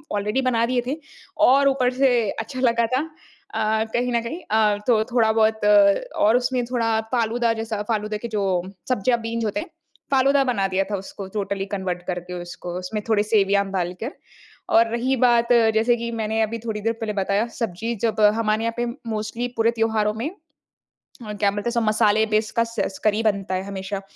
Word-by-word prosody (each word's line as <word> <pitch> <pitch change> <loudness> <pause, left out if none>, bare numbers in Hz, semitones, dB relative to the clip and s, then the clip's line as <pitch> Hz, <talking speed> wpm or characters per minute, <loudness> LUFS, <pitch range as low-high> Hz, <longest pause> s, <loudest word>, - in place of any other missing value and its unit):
Already 210 +5 0
बना 240 -3 +2
दिए 245 +1 0
थे। 285 +5 -2 0.5
और 275 +2 +5
ऊपर 255 -2 +1
से 250 -5 +2
अच्छा 225 +4 -6
लगा 235 -2 +2
था - - +2 0.5
अ, 220 0 +1
कहीं 245 +1 0
न 235 - +2
कहीं। 285 +10 -5
अ, 215 -1 +3
तो 225 -3 +4
थोड़ा-बहुत 220 -2 +2 0.6
और 220 +3 +5
उसमें 250 0 0
थोड़ा 230 -2 0
फ़ालूदा 235 -1 +1
जैसा 225 -2 -4
फ़ालूदा 215 -1 -1
के 235 - -6
जो 210 -3 -2 0.5
सब्जियाँ 245 0 +1
बीन्स 230 0 -3
होते 210 +7 -1
हैं 325 - -6 0.4
फ़ालूदा 275 +1 +4
बना 230 -7 0
दिया 190 0 0
था - - +1
उसको 195 0 -8
टोटली 200 -1 -2
कन्वर्ट 190 -3 -3
करके 180 0 -4
उसको 175 0 -7
उसमें 210 +4 -4
थोड़े 210 -2 +3
सेवइयाँ 200 -2 +2
डाल 180 -2 -1
कर। 245 - -3 0.6
और 230 +1 +6
रही 245 +3 0
बात 235 -2 +4 0.3
जैसे 230 +2 +3
कि 235 0 -4
मैंने 220 -1 -1
अभी 220 +1 -1
थोड़ी 220 -2 -4
देर 225 +2 0
पहले 225 -2 -4
बताया 200 +2 0
सब्ज़ी 225 +1 -3
जब 225 -2 0 0.2
हमारे 220 -1 0
यहाँ 230 0 -1
पे 240 - 0 0.2
मोस्टली 220 +2 -3
पूरे 225 +1 +3
त्योहारों 220 -2 0
में 230 +7 -3 0.7
अ, 215 -3 -10
क्या 205 -1 +1
बोलते 205 +4 -3
हैं 235 -1 +1
मसाले 215 0 +3
बेसकस 220 -1 -1
करी 215 0 +2
बनता 200 -3 0
है 185 - -2
हमेशा। 195 0 -5
220 Hz, 180 wpm, -23 LUFS, 210-235 Hz, 0.7 s, और